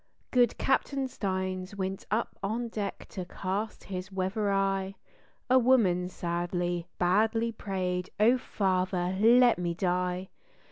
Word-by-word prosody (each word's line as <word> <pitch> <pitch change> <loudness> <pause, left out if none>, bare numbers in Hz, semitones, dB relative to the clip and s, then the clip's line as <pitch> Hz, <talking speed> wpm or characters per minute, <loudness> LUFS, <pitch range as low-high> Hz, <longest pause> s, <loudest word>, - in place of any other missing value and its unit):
Good 245 -2 +3
Capt. 270 +1 +1
Stines 190 -7 -2
went 190 0 -4
up 220 +3 -1
on 230 +4 -2
deck 205 -3 -4
to 185 - -5
cast 195 +4 -4
his 185 0 -6
weather 195 +2 -1
eye; 195 0 0 0.5
A 255 +1 +6
woman 205 -8 +3
sadly, 175 0 -2
badly 220 +6 +2
prayed 185 -4 -3
"Oh, 235 +4 +5
Father, 185 -4 0
let 240 -1 +6
me 170 -1 -1
die!" 180 +1 -1
190 Hz, 125 wpm, -29 LUFS, 180-220 Hz, 0.5 s, A